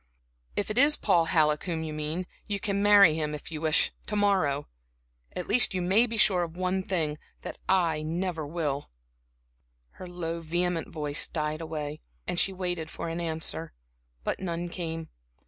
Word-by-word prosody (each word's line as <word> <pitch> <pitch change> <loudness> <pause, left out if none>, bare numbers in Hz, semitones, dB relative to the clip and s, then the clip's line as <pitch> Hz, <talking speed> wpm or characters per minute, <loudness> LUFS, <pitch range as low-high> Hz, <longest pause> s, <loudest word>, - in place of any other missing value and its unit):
If 205 - -1
it 225 - +1
is 295 +2 +6
Paul 175 -5 +3
Halleck 150 -2 +2
whom 165 -3 -2
you 155 -1 -4
mean, 155 +4 -3 0.2
you 205 -1 -1
can 200 +1 -1
marry 200 -5 +7
him, 150 -1 -1
if 150 - -8
you 155 -1 -4
wish, 155 -1 +3 0.2
to 210 - -2
morrow. 185 -9 +2 0.7
At 180 - -3
least 210 -2 +4
you 185 - 0
may 205 +7 +4
be 230 -1 -2
sure 190 -3 +4
of 170 0 -4
one 185 +1 0
thing, 160 -6 -1 0.2
that - - -7
I 170 -5 +3
never 165 +1 -2
will." 145 -3 -2 1.1
Her 185 - -7
low, 170 -1 -4
vehement 175 +1 -1
voice 150 -2 -1
died 155 0 -2
away, 155 -1 -5 0.2
and 180 -1 0
she 195 - +4
waited 180 -4 -3
for 165 - -5
an 165 +1 -3
answer; 160 - -2 0.5
but - - -2
none 175 -1 -3
came. 165 -2 -4
170 Hz, 175 wpm, -28 LUFS, 155-185 Hz, 1.1 s, marry